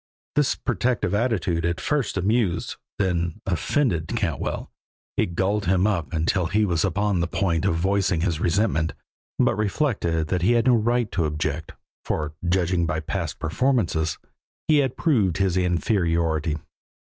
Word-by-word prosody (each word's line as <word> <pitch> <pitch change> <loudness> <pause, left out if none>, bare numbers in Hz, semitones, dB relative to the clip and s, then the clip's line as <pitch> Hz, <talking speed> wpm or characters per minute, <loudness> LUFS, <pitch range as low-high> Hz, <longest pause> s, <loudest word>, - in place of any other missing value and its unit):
This 145 -2 +2
protective 120 -7 -1
attitude 100 -7 0
at 85 0 -1
first 145 -9 -1
amused, 95 -2 0 0.2
then 85 -3 -1
offended 90 - 0
Cantwell, 100 -8 -2 0.4
it 85 - 0
galled 100 +2 0
him 95 +1 +3
until 85 -1 0
he 105 +5 +2
was 85 -4 +1
upon 100 0 +1
the 85 - 0
point 85 -2 0
of - - +2
voicing 95 0 +1
his 85 -3 0
resentment, 85 -3 +1 0.4
but - - +3
reflected 100 - 0
that 90 - 0
he 105 +7 +4
had 120 -1 +2
no 130 - +5
right 120 -1 +1
to 85 -2 0
object, 75 0 -3 0.3
for, 75 0 -2 0.2
judging 90 -1 +1
by 80 -2 -1
past 80 -2 -3
performances, 85 - 0 0.5
he 155 - +5
had 135 -3 0
proved 105 - +2
his 95 -2 +1
inferiority. 85 -4 +1
90 Hz, 145 wpm, -24 LUFS, 85-105 Hz, 0.5 s, no